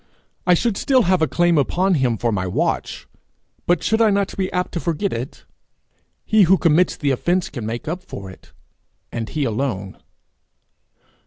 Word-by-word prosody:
I 180 - +6
should 220 +2 0
still 265 -3 +3
have 185 -1 +2
a 160 - +3
claim 175 -1 +2
upon 185 +7 +1
him 130 -7 +1
for 120 +1 0
my 95 -3 -1
watch, 90 - -2 0.6
but 175 - +2
should 220 +1 +1
I 225 - +5
not 200 -1 0
be 190 -1 -2
apt 180 0 -2
to 170 - -3
forget 170 +4 -2
it? 120 +4 -6 0.8
He 215 -1 +4
who 190 - +6
commits 170 +1 +2
the 145 -2 0
offence 175 +7 0
can 120 -6 -5
make 120 +7 -5
up 175 +4 -3
for 100 - -9
it 95 - -17 0.6
and 115 -1 -4
he 150 - -2
alone. 110 -6 -3
165 Hz, 175 wpm, -21 LUFS, 120-185 Hz, 0.8 s, I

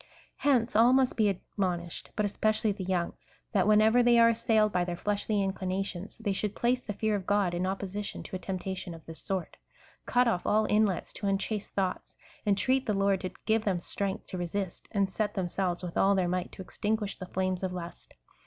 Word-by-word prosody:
Hence 250 -6 +2
all 235 +3 +6
must 260 -1 +3
be 215 -2 +3
admonished, 180 -3 -3
but 210 - +1
especially 215 +1 +1
the 195 -1 -5
young, 180 -2 -1 0.4
that 200 -2 +2
whenever 215 +3 +5
they 240 0 +5
are 230 0 +7
assailed 220 -2 +2
by 180 -2 +1
their 175 -1 -3
fleshly 205 +1 0
inclinations, 190 0 -3
they 215 -4 -1
should 205 +1 -2
place 245 +1 +1
the 220 - -5
fear 215 +1 0
of 190 -2 -4
God 200 -3 +2
in 180 +2 -1
opposition 195 +1 -4
to - - -7
a - - -3
tempta 190 0 -4
tion 180 -2 -6
of 160 - -14
this 165 0 -9
sort, 190 -3 -3 0.5
cut 250 0 +4
ofl" 225 -7 +1
all 215 +1 +3
inlets 210 -4 +1
to 200 - -4
unchaste 195 +1 -2
thoughts, 190 -2 -2 0.3
en 200 - +4
treat 260 +6 +1
the 210 - +1
Lord 195 -1 +2
to 185 - -3 0.2
give 220 0 +2
them 195 -4 +1
strength 195 +2 -3
to 185 - -4
resist, 175 +1 -4
and 200 -2 +1
set 210 0 -1
them 190 -3 0
selves 180 0 -2
with 175 -2 -5
all 200 +1 +4
their 185 -2 +2
might 180 0 -2
to 190 - -7
extinguish 210 +2 -2
the 185 - -6
flames 185 0 -1
of 190 -1 -2
lust. 175 -2 -8
195 Hz, 210 wpm, -29 LUFS, 185-215 Hz, 0.5 s, are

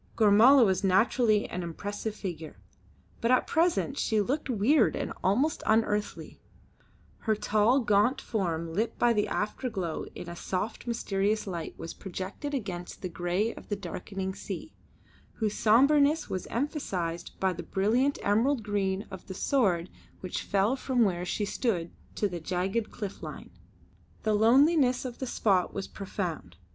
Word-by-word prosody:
Gormala 230 +5 +7
was 190 -1 +1
naturally 215 +2 +3
an 180 - -4
impressive 205 +5 -5
figure, 165 -5 -6 0.6
but 230 - +1
at 255 - +4
present 325 -4 +1
she 220 -2 +1
looked 270 +8 -1
weird 240 +3 +3
and - - -3
almost 260 +12 +2
unearthly. 215 -1 0 0.8
Her 220 -2 +1
tall, 215 +5 +2
gaunt 215 +4 +3
form 170 -6 -2
lit 220 +6 -1
by 240 -1 +4
the 210 -2 +1
afterglow 210 -6 -3
in - - -7
a 170 - -6
soft 200 +7 -4
mysterious 215 -2 0
light 175 -5 -5
was 165 - -6
projected 195 - -5
against 185 -9 -5
the 185 - -2
grey 175 +6 -1
of - - -13
the 205 - 0
darkening 190 0 -5
sea, 200 - -7 0.6
whose 215 -3 -1
sombreness 280 +8 +4
was 185 - -4
emphasised 195 - -3
by 190 -1 +1
the - - -6
brilliant 240 +9 +1
emerald 225 +5 +2
green 200 -1 -1
of 190 -1 -9
the 190 - -6
sward 185 -12 +1 0.3
which 185 - -3
fell 200 +5 +1
from 255 -2 +1
where 185 -5 +1 0.2
we 205 - +1
stood 200 -6 -1 0.2
to 205 - +1
the 175 -3 -5
jagged 190 +6 -1
cliff 200 -2 -6
line. - - -8 0.7
The 215 - +2
loneliness 255 +4 +4
of 245 -2 -6
the 260 - -3
spot 195 -6 +1
was 195 - -3
profound. 175 - -5
210 Hz, 150 wpm, -29 LUFS, 190-240 Hz, 0.8 s, Gormala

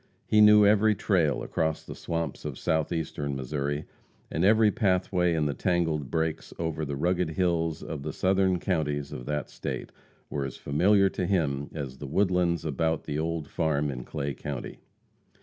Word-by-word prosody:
He 105 - +4
knew 105 0 +8
every 105 +1 +4
"trail" 85 -8 +1
across 80 -1 -1
the - - -8
swamps 85 0 -4
of 75 -3 -5
Southeastern 80 -3 -1
Missouri, 70 +2 -3 0.5
and 80 - 0
every 110 +2 +5
pathway 90 -5 +1
in 80 -2 +1
the 75 - 0
tangled 80 -5 0
brakes 80 -1 -2
over 80 -1 -2
the 70 -1 -3
rugged 90 +3 0
hills 80 -2 0
of 75 -3 -5
the 75 +2 -4
southern 95 -1 +2
counties 75 -6 -1
of 60 - -7
that 75 -1 -2
State, - - -5 0.4
were 70 - -3
as 65 - -5
familiar 95 +7 +3
to 90 - -2
him 75 -7 0
as 70 -4 -5
the 70 - -6
woodlands 90 0 +1
about 80 +2 0
the 75 0 -3
old 80 -2 -2
farm 75 -4 0
in 60 -2 -6
Clay 70 +2 -3
county. 70 -1 -6
80 Hz, 165 wpm, -28 LUFS, 75-90 Hz, 0.5 s, knew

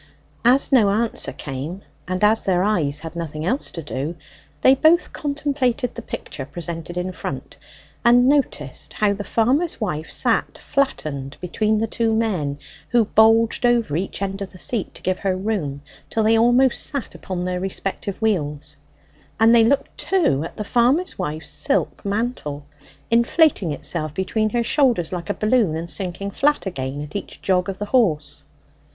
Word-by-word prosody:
As 250 +4 +4
no 230 -7 +5
answer 220 +3 0
came, 150 +7 -6 0.2
and 185 +2 -2
as 215 +1 +4
their 185 -1 +2
eyes 155 -9 0
had 165 +1 -8
nothing 155 -2 -4
else 255 +9 0
to 165 - -6
do, 145 +4 -4 0.5
they 260 - +7
both 315 +5 +3
contemplated 280 -4 -1
the - - -7
picture 135 - -6
presented 170 +3 -5
in 180 +1 -2
front, - - -6 0.5
and 245 +1 +6
noticed 260 - 0
how 210 -1 +2
the 205 +1 -5
farmer's 265 +12 +1
wife 160 -8 -3
sat - - +1
flattened 145 - -2
between 215 +5 0
the 220 - +1
two 225 0 0
men, 180 -11 -1 0.3
who 235 -2 +3
bulged 225 +2 +4
over 235 -10 +2
each 190 +3 -3
end 195 0 -3
of 195 - -4
the 185 - -14
seat 215 +2 -2
to - - -9
give 185 0 0
her 190 -2 0
room, 180 -9 -3 0.3
till 220 - 0
they 220 +1 +4
almost 245 +3 +4
sat 280 -4 -3
upon 180 -1 -5
their 180 0 -2
respective 195 +1 -3
wheels; 150 -8 -1 0.6
and 225 +1 +6
they 230 -1 +7
looked 275 +5 +1
too 330 - +1
at 165 - -8
the 210 - -2
farmer's 250 - +1
wife's 155 -3 -3
silk 280 - -1
mantle, 200 - -3 0.5
inflating 235 - +3
itself 155 +1 -3
between 215 +3 0
her 235 +2 0
shoulders 235 - +2
like 175 -2 -5
a - - +1
balloon 215 -6 +2
and 165 +1 -4
sinking 195 +1 -3
flat 295 +5 +1
again, 140 -6 -4
at 150 +4 -9
each 200 - -6
jog 180 -1 +1
of 190 - -4
the 205 - -3
horse. 165 - +1
200 Hz, 170 wpm, -22 LUFS, 165-235 Hz, 0.6 s, they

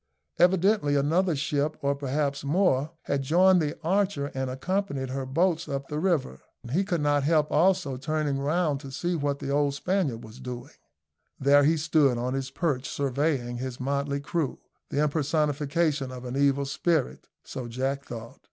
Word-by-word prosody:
Evidently 180 -3 +3
another 160 +5 +2
ship, 145 +1 -1
or 140 0 +2
perhaps 140 0 -2
more, 150 -2 +2
had 140 - -1
joined 180 +6 +4
the 150 0 -2
Archer 185 -5 0
and 130 -1 -2
accompanied 140 -1 -2
her 135 0 -3
boats 165 +3 +1
up 140 -1 -3
the 150 - -2
river. 155 - 0 0.3
He 180 +8 +2
could 175 -5 -1
not 145 -1 +2
help 150 +1 +2
also 170 -4 +2
turning 150 0 -1
round 150 0 0
to 140 -1 -9
see 175 +6 -2
what 145 -2 -1
the 140 - -4
old 145 -1 +1
Spaniard 145 -8 -1
was 110 +3 -12
doing. 125 -2 -7 0.7
There 140 +1 +5
he 160 +2 +3
stood 150 -5 +3
on 125 +2 -2
his 135 0 -2
perch 140 -5 -1
surveying 135 -3 -1
his 130 -1 -5
motley 140 +1 -1
crew 155 -1 -2 0.3
the 145 - +1
impersonation 150 -1 0
of 125 0 -8
an 125 +1 -4
evil 140 0 +2
spirit 140 +1 -1 0.2
so 125 -2 -6
Jack 135 +4 -2
thought. 115 -1 -8
145 Hz, 165 wpm, -27 LUFS, 135-160 Hz, 0.7 s, There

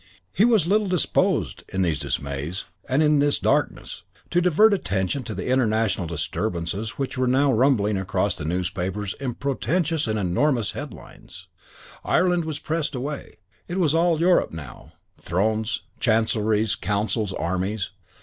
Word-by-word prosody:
He 200 - +4
was 225 -8 +4
little 205 +3 +2
disposed, 180 -3 +1
in 95 0 0
these 80 -4 0
dismays 70 +5 -3 0.2
and 135 +4 +3
in 150 -1 +4
this 145 0 +2
darkness, - - -1 0.3
to 175 - +3
divert 185 +5 +5
attention 100 - -1
to 110 - -5
the 95 - -4
international 110 -7 +1
disturbances 85 +5 -3
which 135 -1 -3
now 130 +2 +3
were 115 - +1
rumbling 110 -6 +3
across 95 0 0
the 80 - -7
newspapers 90 +4 -2
in 130 -4 -3
portentous 155 +2 -1
and 110 0 0
enormous 110 +5 +1
headlines. - - -10 0.5
Ireland 180 -2 +2
was 155 -2 -3
pressed 155 -2 -2
away. 140 +3 -5 0.3
It 175 - -4
was 165 -6 +2
all 165 -1 +3
Europe 175 +2 +3
now 75 -6 -10 0.3
thrones, 110 +6 0 0.2
chancelleries, 110 -2 +2
councils, 105 +1 -1
armies. 95 +4 -2
115 Hz, 140 wpm, -24 LUFS, 95-150 Hz, 0.5 s, divert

